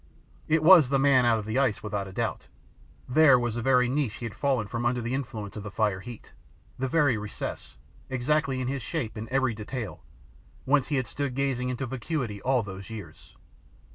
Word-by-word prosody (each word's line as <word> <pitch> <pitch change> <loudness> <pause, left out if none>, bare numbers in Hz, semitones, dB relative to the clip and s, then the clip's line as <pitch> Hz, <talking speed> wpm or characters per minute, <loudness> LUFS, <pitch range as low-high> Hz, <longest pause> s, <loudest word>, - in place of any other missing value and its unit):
It 155 0 +2
was 165 -6 +8
the 135 - +3
man 135 -3 +4
out 115 -1 +4
of 105 - -5
the 110 +4 0
ice 130 -7 +1
without 105 -2 -3
a - - -9
doubt. - - -3 0.6
There 140 0 +6
was 120 -2 -1
the 120 - -3
very 125 0 +3
niche 130 -3 -1
he 120 - -7
had 115 - -5
fallen 135 -6 0
from 115 +2 -3
under 120 +1 +1
the 120 +1 -3
influence 115 -7 -4
of 105 - -5
the 105 - -6
fire 100 -1 0
heat, 120 +3 -10 0.5
the 130 - 0
very 135 -5 +2
recess, 105 -1 -6 0.3
exactly 135 +1 0
in 130 - -2
his 135 0 -2
shape 115 -4 -4
in 110 +1 -6
every 130 -2 +1
detail, 110 +1 -6 0.6
whence 140 -1 +3
he 150 - -1
had 130 -2 0
stood 140 -2 -4
gazing 130 -2 -1
into 125 +1 -3
vacuity 125 -4 -3
all 130 -2 +2
those 95 0 -8
years. 100 -9 -10
125 Hz, 200 wpm, -27 LUFS, 110-135 Hz, 0.6 s, was